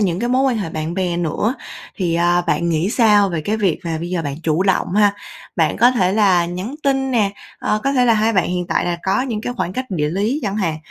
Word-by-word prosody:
những 180 -4 0
cái 240 - -1
mối 255 +2 +2
quan 260 -4 +2
hệ 185 -6 -4
bạn 155 +1 -4
bè 180 -2 -1
nữa. 175 - -1 0.4
Thì, 175 -4 -1
à, 175 +1 +2
bạn 170 - 0
nghĩ 165 +4 0
sao 210 -4 +4
về 170 -4 -2
cái 210 +8 -1
việc 195 -7 0
là 165 -1 -2
bây 170 +2 -5
giờ 180 -2 -1
bạn 140 -2 -4
chủ 160 +3 +1
động 190 -2 +1
ha? 205 -1 +4 0.4
Bạn - - +1
có 245 - +5
thể 190 -7 +1
là 190 -5 +3
nhắn 185 +10 -5
tin 270 -1 +1
nè, 215 -5 +1 0.3
ờ, 210 0 -1
có 275 - +1
thể 255 -2 +3
là 235 -2 +4
hai 220 +1 +2
bạn 185 -5 +1
hiện 180 0 -2
tại - - 0
là 175 -1 -2
có 195 +6 +1
những 235 -5 -3
cái 245 - -4
khoảng 180 - -2
cách 255 +6 -3
địa 150 -5 -1
lý 210 - -1
chẳng 200 -1 -2
hạn, 170 -7 -1
195 Hz, 265 wpm, -19 LUFS, 170-220 Hz, 0.4 s, có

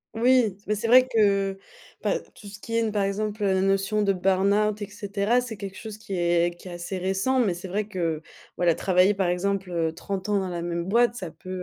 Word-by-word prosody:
Oui, 240 -3 +3
mais 210 - +1
c'est 210 - -4
vrai 255 +2 +7
que, 200 -4 +2 0.5
bah - - +1
tout - - -18
ce 200 0 -10
qui 230 +2 -5
est 230 - +3
n 225 -1 0
par 205 -1 0
exemple, 210 +2 -2
heu, 195 - +2
la 190 0 +2
notion 195 +2 +1
de 200 -1 +2
burn-out, 200 +3 +2
et - - -5
cetera. 205 +3 0
C'est 235 -3 -7
quelque 195 -1 -7
chose 215 0 -8
qui 215 -2 -8
est 175 -1 +1
qui 175 - -14
est 180 - -7
assez 175 +2 -5
récent 195 +8 0
mais 205 -8 +2
c'est 175 +2 -7
vrai 205 +3 -2
que, 170 -6 -2 0.3
voilà, 175 -2 +2
travailler, 185 +2 +3
par 195 -1 0
exemple, 190 +1 -1
heu, 165 -2 0
30 190 +4 -5
ans 205 - +2
dans 190 -1 -3
la 175 -1 -4
même 170 0 -2
boîte, 235 +5 +3
ça 185 -8 -6
peut, 185 - -13
195 Hz, 235 wpm, -25 LUFS, 185-215 Hz, 0.5 s, vrai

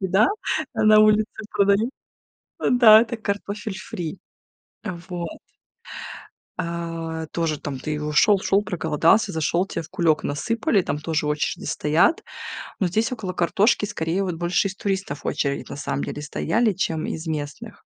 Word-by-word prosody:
еда 190 +4 +3 0.5
на 215 -1 +5
улице 215 +1 +3
продают. 200 +4 +2 0.8
Да, 225 -3 +8
это 235 0 -2
картофель 205 -1 -4
фри. 175 -3 -6 0.7
А 180 -5 -4
вот. 175 -2 -5 1.2
А 165 -1 -4
тоже 160 -3 -1
там 140 -3 -5
ты 150 +2 -3
у 150 0 -3
шёл 200 +7 +5
шёл, 200 +1 +2
проголодался, 165 +2 +2
зашёл, 160 +4 0
тебе 165 - -4
в 155 - -13
кулёк 170 -4 +1
насыпали, 205 +6 0
там 145 - -2
тоже 155 0 -1
очереди 150 0 -1
стоят. 155 - +2 0.6
Но 190 - +2
здесь 220 +7 0
около 210 -7 -4
картошки, 205 +5 +2
скорее, 170 +1 -1
вот 180 -3 -2
больше 175 +3 +1
из 195 - -7
туристов 195 -8 -3
очередь, 140 -1 -2
на - - -6
самом 140 -1 -2
деле, 150 - -5
стояли, 205 +8 0
чем 165 -4 -1
из 160 +1 -5
местных. 155 +9 -5
180 Hz, 150 wpm, -23 LUFS, 160-210 Hz, 1.2 s, Да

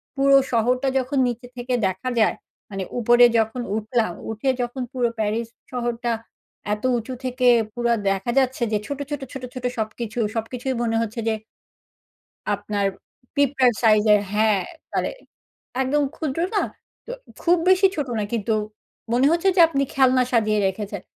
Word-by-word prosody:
পুরো 275 0 +5 0.2
শহরটা 250 +3 +1
যখন 265 +2 -1
নিচে 245 +1 -4
থেকে 245 +1 -3
দেখা 190 +7 -3
যায়। 215 - +3 0.3
মানে 195 -1 -4 0.2
উপরে 240 +1 +6
যখন 225 +3 0
উঠলাম, 220 -1 0 0.2
উঠে 225 +5 -1
যখন 245 +2 -3
পুরো 245 -2 +1
প্যারিস 220 +2 -1 0.2
শহরটা 240 -1 -2 0.6
এত 210 - -5
উঁচু 235 +3 -5
থেকে 255 0 +1 0.3
পুরো 240 -1 0 0.2
দেখা 195 +4 -1
যাচ্ছে 260 -1 0
যে 210 - +2
ছোট, 285 0 -4
ছোট, 290 -2 -4
ছোট, 270 -2 -7
ছোট 255 -1 -6
সবকিছু, 220 +1 -4 0.2
সবকিছুই 250 +4 -3
মনে 225 -1 0
হচ্ছে 230 +1 -4
যে 225 - +2 1.2
আপনার 205 0 -2 0.5
পিঁপড়ার 270 -3 +3
সাইজের 215 -2 +5
হ্যাঁ। 210 -1 +3 0.3
মানে - - 0 0.7
একদম 290 +3 +1
ক্ষুদ্র 310 0 -3 0.2
না? - - +3 0.4
তো - - -9 0.3
খুব 350 +1 +4
বেশি 375 +1 +6
ছোট 290 -3 -2
না 210 - 0
কিন্তু 225 -1 0 0.6
মনে 250 +3 +4
হচ্ছে 340 +3 +2
যে - - +5
আপনি 275 -3 0
খেলনা 260 -1 +4
সাজিয়ে 215 -3 +2
রেখেছেন। 200 0 -5
240 Hz, 150 wpm, -23 LUFS, 220-260 Hz, 1.2 s, উপরে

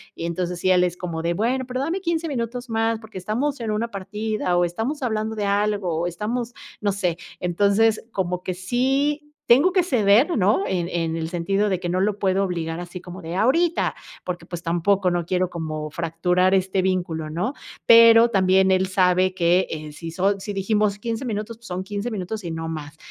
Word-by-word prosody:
y 165 - -5
entonces, 175 +1 -3
sí, 185 - +1
él 180 -1 +5
es 175 -1 0
como 170 -3 -4
de: 170 +1 0
"Bueno, 245 +7 0
pero 255 0 -3
dame 330 +7 -1
15 335 -2 -1
minutos 245 -1 -4
más, 225 0 0
porque 220 -3 -11
estamos 245 +10 -2
en 225 -2 -2
una 220 +2 -1
partida 205 -1 -2
o 175 - +3
estamos 225 - -3
hablando 220 -3 -1
de 210 -1 -2
algo 200 -3 0
o 175 - 0
estamos 230 +7 -3 0.3
no 205 -1 +1
sé. 180 -4 -1 0.2
Entonces, 205 +5 +2
como 180 -3 -2
que 185 - -2
sí 265 +10 0 0.3
tengo 275 +10 +6
que 370 -2 +4
ceder, 245 - +3
¿no?, 195 +1 +3
en 180 -3 -1
en 165 -2 -1
el 160 -1 -3
sentido 195 +4 0
de 185 -2 0
que 175 - -4
no 180 +2 0
lo 205 +1 +1
puedo 195 -1 +1
obligar 170 -3 -3
así 175 +1 -7
como 180 +1 -10
de: 165 0 -6
"¡Ahorita!", 325 - +2 0.3
porque, 180 -1 -5
pues, 175 -1 -6
tampoco, 180 +3 +1
no 175 0 0
quiero 180 0 0
como 155 -2 -4
fracturar 180 +4 +1
este 190 0 +1
vínculo, 175 -4 -1
¿no? 175 - -2 0.3
Pero 230 0 +8
también 190 -1 +4
él 190 0 +2
sabe 185 0 +2
que, 175 +1 +3
eh, 155 -1 -6
si 165 +3 -8
son 195 +4 0
si 205 - -5
dijimos 205 +1 +1
15 230 +4 -4
minutos, 215 -1 -4
pues, 235 0 -15
son 185 0 -4
15 205 +4 -4
minutos 210 0 -4
y 170 - -4
no 160 0 -4
más. 155 -1 -7
190 Hz, 205 wpm, -23 LUFS, 175-225 Hz, 0.3 s, Pero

